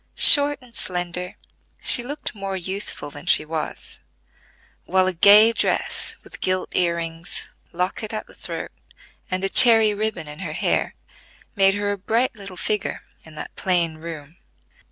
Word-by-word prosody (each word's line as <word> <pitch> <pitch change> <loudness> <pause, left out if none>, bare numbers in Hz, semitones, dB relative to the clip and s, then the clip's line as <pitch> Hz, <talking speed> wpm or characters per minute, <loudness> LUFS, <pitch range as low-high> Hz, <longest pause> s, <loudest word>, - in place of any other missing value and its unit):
Short 290 -1 +7
and 240 -2 -18
slender, 180 0 -4 0.4
she - - +6
looked 285 +5 -6
more 195 -2 -5
youthful 190 -4 -6
than 145 +4 -12
she - - +6
was; 155 0 -5 0.8
while 185 0 +2
a 185 - 0
gay 210 +6 +6
dress, - - -2
with - - -13
gilt 185 0 -2
ear 170 -1 +1
rings, 165 +1 -5 0.2
locket 185 +5 -3
at 215 -1 -5
the - - -18
throat, - - -7 0.6
and 185 +1 -3
a - - +2
cherry 225 -1 +7
ribbon 215 -6 -4
in 150 +1 -10
her 170 -5 -5
hair - - -1 0.6
made 195 -1 +4
her 205 0 -2
a 200 - -5
bright 225 +6 -1
little 195 -3 -11
figure 210 +2 -3 0.2
in 160 -1 -15
that - - -9
plain 170 -4 -1
room. 160 0 -10
185 Hz, 155 wpm, -22 LUFS, 170-210 Hz, 0.8 s, Short